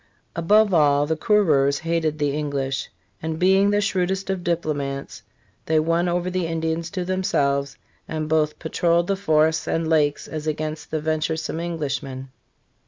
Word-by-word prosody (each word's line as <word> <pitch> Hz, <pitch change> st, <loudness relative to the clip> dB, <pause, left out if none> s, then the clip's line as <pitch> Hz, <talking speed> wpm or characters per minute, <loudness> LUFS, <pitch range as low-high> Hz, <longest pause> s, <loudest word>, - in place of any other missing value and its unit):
Above 205 Hz, +4 st, +4 dB
all, 145 Hz, -3 st, +4 dB
the 160 Hz, +2 st, 0 dB
conreurs 155 Hz, -7 st, +3 dB
hated 165 Hz, -2 st, -1 dB
the 145 Hz, -1 st, 0 dB
English; 140 Hz, -4 st, -2 dB, 0.3 s
and 160 Hz, 0 st, -3 dB
being 190 Hz, +3 st, +4 dB
the 205 Hz, 0 st, +2 dB
shrewdest 190 Hz, -1 st, -1 dB
of 185 Hz, -2 st, -3 dB
diplomats 145 Hz, -5 st, -3 dB, 0.5 s
they 160 Hz, 0 st, +3 dB
won 165 Hz, +3 st, +1 dB
over 175 Hz, +1 st, -1 dB
the 180 Hz, -2 st, -1 dB
Indians 165 Hz, 0 st, -2 dB
to 180 Hz, 0 st, -4 dB
themselves, 140 Hz, -7 st, 0 dB, 0.3 s
and 155 Hz, -1 st, -3 dB
both 155 Hz, -1 st, +1 dB
pa 160 Hz, -, -6 dB
trolled 170 Hz, 0 st, +2 dB
the 195 Hz, -, 0 dB
forests 160 Hz, -4 st, +2 dB
and 165 Hz, 0 st, 0 dB
lakes 150 Hz, -3 st, +1 dB
as 155 Hz, 0 st, -5 dB
against 155 Hz, 0 st, -3 dB
the 155 Hz, -, -1 dB
venturesome 160 Hz, +1 st, -2 dB
Englishmen. 140 Hz, -6 st, -4 dB
160 Hz, 155 wpm, -23 LUFS, 150-175 Hz, 0.5 s, Above